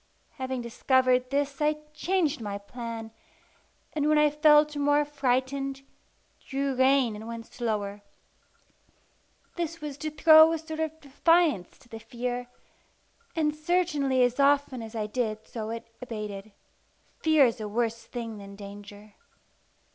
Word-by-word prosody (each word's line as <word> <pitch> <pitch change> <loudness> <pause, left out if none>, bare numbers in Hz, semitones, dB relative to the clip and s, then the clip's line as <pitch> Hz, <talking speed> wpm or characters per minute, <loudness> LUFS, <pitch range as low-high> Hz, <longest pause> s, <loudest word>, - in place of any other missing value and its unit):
Having 260 -1 -3
discovered 255 +1 +2
this, 280 +1 -1
I 300 +1 +3 0.2
changed 320 -3 0
my 205 -2 -4
plan, 225 +1 -7 0.8
and 300 -1 +1
when 305 - +4
I 300 -1 +4
felt 300 0 +5
more 290 +1 +2
frightened, 270 -1 -1 0.6
drew 275 0 -2
rein 260 -3 +3
and 215 +2 -8
went 230 0 -6
slower. 210 -4 -3 1.6
This 335 -1 -3
was 295 -2 -7
to 310 - -3
throw 315 +1 +7
a - - 0
sort 315 0 -7
of 315 0 -3
defiance 295 - +2
to 275 - -22
the 225 -1 -9
fear; 245 +1 -4 0.9
and 305 -2 +1
certainly 305 -6 +1
as 245 +2 +1
often 280 -3 +3
as 225 0 -9
I 215 -1 -1
did 220 -1 -3
so 220 -2 -6
it 230 0 -6
abated. 210 -4 -6 0.7
Fear 315 -3 +5
is 230 -2 -1
a 215 - -3
worse 230 +1 -1
thing 230 -3 -6
than 200 0 -10
danger. 205 +1 -11
260 Hz, 140 wpm, -27 LUFS, 225-300 Hz, 1.6 s, throw